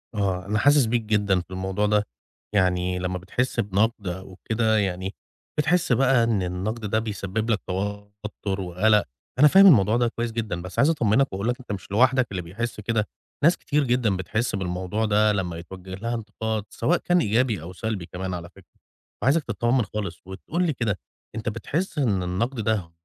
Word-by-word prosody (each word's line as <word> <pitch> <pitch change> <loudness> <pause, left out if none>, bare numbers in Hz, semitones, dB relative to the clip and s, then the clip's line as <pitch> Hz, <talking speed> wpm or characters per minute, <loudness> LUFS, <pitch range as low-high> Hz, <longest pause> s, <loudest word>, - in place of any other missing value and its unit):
آه، 95 -3 -1
أنا 105 +2 0
حاسس 145 +3 +5
بيك 115 +1 +1
جدًا 105 -3 +1
في 90 - -17
الموضوع 95 +2 -1
ده، 105 0 +2 0.5
يعني 90 -1 +2
لمّا 90 0 -2
بتحس 120 +8 -2
بنقد 105 0 0
أو 95 +1 -6
كده 110 -1 +2
يعني، 95 -1 -2 0.4
بتحس 165 +1 +2
بقى 125 0 +4
إن 110 -5 +1
النقد 95 +6 -3
ده 110 +2 +1
بيسبب 110 0 -3
لك 110 -2 +2
توتر 100 +1 -4
وقلق، 100 +4 +3 0.4
أنا 150 - +9
فاهم 195 +6 +8
الموضوع 110 - +6
ده 120 0 +2
كويس 120 0 -3
جدًا، 110 -6 -3
بس 90 0 -6
عايز 140 - +5
أطمنّك 135 -4 +2
وأقول 100 +3 -2
لك 125 +1 -1
أنت 125 - -9
مش 95 -2 -6
لوحدك 130 +4 +4
اللي 95 -2 -3
بيحس 105 +8 -5
كده، 105 0 0 0.4
ناس 165 +4 +5
كتير 150 0 0
جدًا 120 -6 +1
بتحس 105 +6 -1
بالموضوع 95 +3 -2
ده 105 0 +3
لمّا 90 -5 -2
يتوجه 95 +2 -9
لها 115 +5 -3
انتقاد، 110 -1 -3
سواء 175 - +1
كان 175 +1 +2
إيجابي 110 -3 +1
أو 85 +3 -8
سلبي 105 -2 -3
كمان 90 +2 -5
على 85 -1 -6
فكرة، 95 0 -21 0.4
فعايزك 145 +5 +3
تطمّن 120 -2 +1
خالص، 100 -6 -5
وتقول 105 - -3
لي 165 -4 +1
كده 110 -6 -1 0.4
أنت 110 +1 -2
بتحس 165 - -3
إن 105 -10 +1
النقد 115 +9 -2
ده، 105 -6 -1
105 Hz, 180 wpm, -25 LUFS, 95-120 Hz, 0.5 s, أنا